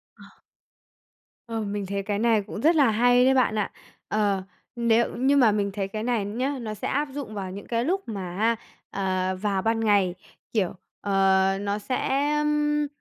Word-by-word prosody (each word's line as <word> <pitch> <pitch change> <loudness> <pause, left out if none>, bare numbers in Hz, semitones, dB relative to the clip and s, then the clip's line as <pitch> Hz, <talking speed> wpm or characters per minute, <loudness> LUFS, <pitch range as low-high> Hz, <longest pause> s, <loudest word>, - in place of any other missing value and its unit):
Ờ. - - -16 1.2
Ờm, 225 -3 -3
mình 205 -1 -3
thấy 200 +1 -2
cái 200 0 -2
này 225 -1 +3
cũng 200 - -7
rất 320 +6 +4
là 280 -6 +5
hay 245 +3 +4
đấy 265 +1 +4
bạn 255 -4 +3
ạ. 210 - -1 0.4
Ờ, 205 -3 +1 0.3
nếu 235 -1 +2
nhưng 275 +3 +4
mà 225 -4 +5
mình 205 -1 0
thấy 195 -1 -3
cái 215 +2 -4
này 235 -3 0
nhá, 255 +7 -2
nó 215 -2 -4
sẽ 210 - -4
áp 290 +2 0
dụng 270 -6 -6
vào 195 -2 -4
những 200 +2 -8
cái 230 0 -1
lúc 370 +7 0
mà 185 -5 -5
á, 230 +2 +2 0.3
ờ, 185 -1 -1
vào 195 0 -1
ban 225 +1 +1
ngày, 200 -5 +3 0.4
kiểu, 200 -6 +1 0.3
ờ, 195 -1 +3
nó 200 0 -1
sẽ, 270 +5 0
ưm, 295 0 +1
215 Hz, 190 wpm, -25 LUFS, 200-250 Hz, 1.2 s, là